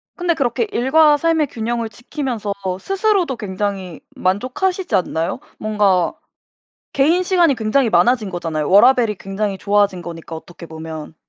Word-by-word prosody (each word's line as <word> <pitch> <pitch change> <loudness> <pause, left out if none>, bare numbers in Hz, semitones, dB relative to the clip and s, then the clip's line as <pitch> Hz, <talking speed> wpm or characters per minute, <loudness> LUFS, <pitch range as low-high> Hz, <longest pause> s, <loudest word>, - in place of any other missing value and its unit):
근데 350 -1 0
그렇게 310 - -1
일과 295 +5 +4
삶의 320 0 +1
균형을 230 -1 -3
지키면서 240 -2 -4 0.3
스스로도 390 - 0
굉장히 195 -4 -4 0.2
만족하시지 260 - -1
않나요? 165 -2 -1 0.2
뭔가 205 -5 +1 0.8
개인 320 +7 +3
시간이 350 -6 +3
굉장히 230 +3 +1
많아진 235 -2 +3
거잖아요. 165 -4 -3
워라밸이 230 +2 +5
굉장히 195 +1 -3
좋아진 200 -2 +1
거니까 165 -1 -8
어떻게 170 +1 -11
보면. 160 -1 -8
220 Hz, 350 characters per minute, -19 LUFS, 185-285 Hz, 0.8 s, 워라밸이